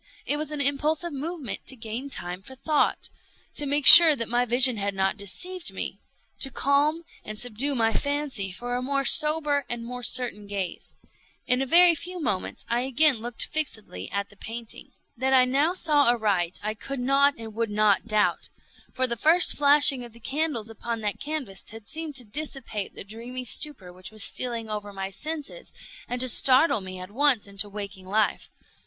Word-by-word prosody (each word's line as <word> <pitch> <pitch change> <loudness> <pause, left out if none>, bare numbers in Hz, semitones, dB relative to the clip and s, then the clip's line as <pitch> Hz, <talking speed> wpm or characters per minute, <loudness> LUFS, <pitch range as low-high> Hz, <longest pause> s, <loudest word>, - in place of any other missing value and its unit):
It 290 - -1
was 305 0 -4
an 300 -1 -2
impulsive 300 +4 -1
movement 295 - -6
to 265 - -1
gain 230 +4 -7
time 180 -6 -5
for 265 +7 -13
thought—to 295 0 -2
make 285 0 0
sure 330 -3 +12
that 230 -4 -4
my 245 +1 0
vision 245 0 +5
had 200 -1 -3
not 190 0 0
deceived 355 - -4
me—to 270 - -5
calm 285 +5 0 0.2
and 215 0 -8
subdue 245 +5 -2
my 225 -2 +1
fancy 285 -9 -2
for 245 +6 -6
a 250 - -2
more 275 +1 -2
sober 300 -1 +5
and 235 -1 -5
more 250 +1 -7
certain 240 -4 -2
gaze. 195 -3 -5 0.5
In 250 +1 0
a 270 - -2
very 345 +3 +6
few 355 +4 -5
moments 205 - -4
I 235 +1 -1
again 270 +2 +3
looked 235 +1 -5
fixedly 220 - -4
at 200 +1 -4
the 205 - -17
painting. 225 +2 -9 0.3
That 265 +2 0
I 255 -1 +5
now 280 +7 +1
saw 295 -6 +2
aright 200 -7 -1
I 215 +1 -2
could 270 +5 -7
not 275 +3 +2
and 225 -1 -9
would 230 0 -3
not 210 -1 +1
doubt; 215 -2 0 0.4
for 260 - 0
the 235 -2 -3
first 325 +8 +4
flashing 285 -2 +5
of 240 -2 -12
the 235 - -16
candles 270 -4 -3
upon 230 +1 -6
that 210 -1 -3
canvas 285 -11 -5
had 220 0 -12
seemed 320 -2 -5
to 250 -2 +1
dissipate 240 -4 -4
the - - -8
dreamy 235 +5 -8
stupor 245 - -1
which 180 0 -10
was 215 -1 -8
stealing 235 -3 -3
over 210 -1 -6
my 195 0 -5
senses, 315 - -6 0.4
and 245 - -4
to 255 - +6
startle 255 +1 +3
me 185 -1 -8
at 185 +1 -9
once 265 -1 +1
into 200 +1 -4
waking 200 -2 -8
life. 210 +2 -1
245 Hz, 185 wpm, -25 LUFS, 215-285 Hz, 0.5 s, sure